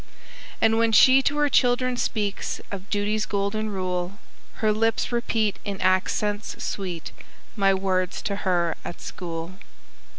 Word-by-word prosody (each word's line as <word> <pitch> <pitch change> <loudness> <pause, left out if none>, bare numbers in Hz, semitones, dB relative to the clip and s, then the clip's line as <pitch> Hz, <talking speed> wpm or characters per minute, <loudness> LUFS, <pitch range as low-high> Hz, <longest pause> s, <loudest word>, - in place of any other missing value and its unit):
"And 225 0 +3
when 230 0 +3
she 260 +4 +7
to 290 +2 0
her 295 0 +3
children 250 -2 +2
speaks 210 -4 -2
Of 200 0 -7
duty's 210 +1 0
golden 205 +2 -1
rule, 185 -1 -3 0.4
Her 215 -1 +1
lips 225 +2 0
repeat 225 -3 0
in 200 -2 -4
accents 205 +3 0
sweet, 180 -5 -4 0.4
My 195 -2 +3
words 185 -1 -1
to 200 -1 -2
her 175 -4 +1
at 175 - -7
school." 165 -1 -6
205 Hz, 135 wpm, -25 LUFS, 185-225 Hz, 0.4 s, she